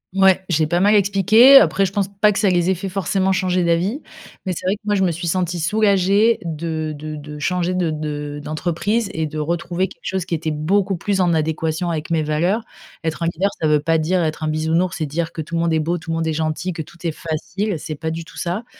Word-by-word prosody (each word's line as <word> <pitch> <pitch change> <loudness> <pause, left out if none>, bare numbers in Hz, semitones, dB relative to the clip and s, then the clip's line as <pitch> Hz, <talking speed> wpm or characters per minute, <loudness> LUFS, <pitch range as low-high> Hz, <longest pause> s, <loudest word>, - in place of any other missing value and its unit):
Ouais, 190 -1 +4
j'ai 160 -3 +1
pas 175 +3 +1
mal 205 +3 +4
expliqué, 210 +6 +6
après 195 -7 +4
je - - -7
pense 195 -1 0
pas 200 +2 +2
que 205 - -3
ça 210 - +2
les 175 0 +2
ait 190 - +2
fait 195 +3 -5
forcément 190 0 0
changer 185 -1 +1
d'avis, 175 - 0 0.4
mais 185 - -1
c'est 180 - -5
vrai 190 - +2
que 210 - -19
moi, 210 - +1
je 200 - +1
me 185 - +3
suis 170 +2 -5
sentie 175 0 -1
soulagée 200 +4 +3
de 160 -1 -3
de 155 +1 -6
de 150 0 -9
changer 180 +3 0
de 180 -2 0
de 150 -1 -4
d'entreprise 175 +8 -1
et 160 0 0
de 155 0 -5
retrouver 170 +4 -1
quelque - - -17
chose 190 -2 -2
qui 170 - -2
était 160 0 -2
beaucoup 185 +6 0
plus 195 +3 -1
en 175 -2 +3
adéquation 160 +2 -1
avec 165 0 -3
mes 160 - +2
valeurs. 170 +9 0 0.4
Être 160 +1 -2
un - - +1
leader, 175 +4 0
ça 155 - +1
veut 150 -1 +4
pas 165 +2 +1
dire 170 +3 +1
être 155 0 -3
un - - 0
bisounours 160 +3 0
et 155 - 0
dire 165 +3 -2
que 160 - -5
tout 165 +2 -6
le 165 - +1
monde 170 -1 +1
est 160 - +2
beau, 165 +3 -1
tout 165 0 -7
le - - 0
monde 165 0 -1
est 160 - 0
gentil, 160 +4 -2
que 165 -1 -5
tout 170 - -17
est 165 - 0
facile, 175 +6 -3
c'est 155 +1 -5
pas 160 +2 -4
du 165 +1 -5
tout 165 0 -15
ça. 185 +6 -3
170 Hz, 255 wpm, -20 LUFS, 155-190 Hz, 0.4 s, expliqué